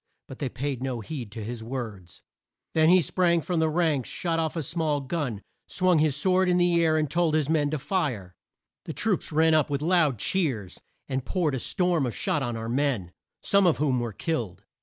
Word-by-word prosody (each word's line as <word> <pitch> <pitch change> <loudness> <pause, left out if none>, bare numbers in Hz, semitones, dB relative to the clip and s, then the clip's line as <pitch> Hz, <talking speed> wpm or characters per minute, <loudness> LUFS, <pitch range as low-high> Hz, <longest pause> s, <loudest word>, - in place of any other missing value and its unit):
But 135 - -10
they 140 - -2
paid 130 +1 -4
no 130 -3 -3
heed 120 -3 -6
to 110 -2 -6
his 115 +1 -6
words. 110 -8 -7 0.5
Then 160 0 +4
he 185 +1 +6
sprang 170 0 +2
from 170 +1 -2
the 160 0 +2
ranks, 155 -6 0
shot 165 -2 -1
off 160 0 -1
a 165 - -2
small 155 0 -1
gun, 135 -7 -3 0.2
swung 180 -3 +2
his 150 -3 +2
sword 185 0 +2
in 180 0 +3
air, 170 -2 +3
and 155 -1 +1
told 165 +1 +1
his 155 -3 +1
men 150 -2 +2
to 155 - -1
fire. 130 - -2 0.5
The 160 - -5
troops 205 -2 -1
ran 160 +1 +4
up, 155 -2 +3
with 145 0 -2
loud 165 -7 +3
cheers, 115 - -1 0.3
and 130 -1 -2
poured 165 -1 0
a 130 - -1
storm 175 - +1
of 120 - -5
shot 150 - 0
on 120 -3 -2
our 115 0 -5
men, 120 -8 -1 0.3
some 200 -2 +4
of 165 - +3
whom 135 -4 +1
were 120 -1 -3
killed. 115 - -3
150 Hz, 205 wpm, -26 LUFS, 125-170 Hz, 0.5 s, he